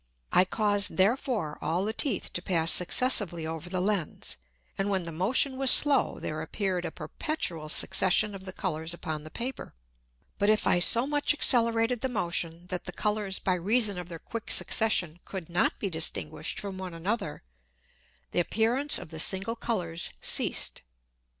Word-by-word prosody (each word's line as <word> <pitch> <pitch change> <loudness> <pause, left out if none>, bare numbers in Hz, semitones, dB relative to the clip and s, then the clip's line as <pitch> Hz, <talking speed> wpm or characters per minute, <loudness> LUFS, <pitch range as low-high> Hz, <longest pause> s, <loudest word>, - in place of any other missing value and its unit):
I 180 - +4
caused 205 0 +2
therefore 205 - -1
all 175 +4 -2
the 220 - -3
Teeth 230 -4 0
to 175 - -4
pass 170 -2 +2
successively 180 -4 +5
over 160 +2 -6
the 185 0 -3
Lens, 190 -3 -2 0.4
and 195 +1 -3
when 190 -2 0
the 165 - -7
Motion 240 - 0
was 270 -1 +3
slow, 285 0 +6
there 155 0 -5
appeared 180 +1 -3
a - - -4
perpetual 170 - -4
Succession 195 +6 +3
of 190 -1 -10
the 185 - -7
Colours 165 -3 -4
upon 155 -3 -6
the 155 - -10
Paper: 245 - -7 0.6
But 205 - +1
if 215 0 +2
I 175 - +3
so 235 +7 +4
much 290 +1 0
accelerated 230 -3 +2
the 260 - -2
Motion, 170 -5 -3
that 180 -1 -5
the - - -5
Colours 210 -1 -2
by 185 - -1
reason 205 +2 +1
of 180 0 -9
their 170 - -7
quick 230 +6 -8
Succession 175 -7 +2
could 185 -4 -8
not 175 - +1
be 200 - -4
distinguished 160 -2 -3
from 195 -2 -7
one 185 -2 -7
another, 190 - -4 0.9
the - - -1
Appearance 235 - +1
of - - -9
the 160 -1 -9
single 195 +7 +1
Colours 175 -9 -2
ceased. - - 0
190 Hz, 170 wpm, -27 LUFS, 170-225 Hz, 0.9 s, slow